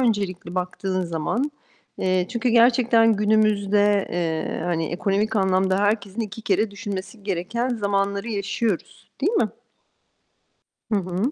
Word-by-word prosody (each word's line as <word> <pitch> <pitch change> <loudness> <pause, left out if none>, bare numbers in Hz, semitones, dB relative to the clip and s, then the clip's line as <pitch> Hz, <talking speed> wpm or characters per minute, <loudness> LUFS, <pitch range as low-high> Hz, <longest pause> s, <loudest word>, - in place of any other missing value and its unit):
öncelikli 200 -7 -1
baktığın 185 +1 -2
zaman. 175 - -1 0.5
Eee, 185 -1 +1
çünkü 245 0 0
gerçekten 235 -1 +5
günümüzde, 205 -1 +3
eee, 165 -2 -2
hani 165 -2 0
ekonomik 200 +4 0
anlamda 190 -1 +2
herkesin 205 +1 0
2 220 +1 -5
kere 205 +1 +1
düşünmesi 200 0 -6
gereken 200 +6 -2
zamanları 200 -2 -1
yaşıyoruz, 200 -1 -3
değil 365 +10 +2
mi? - - +2 1.4
Hı 210 - +3
hı. 185 +8 -1
200 Hz, 115 wpm, -23 LUFS, 185-225 Hz, 1.4 s, gerçekten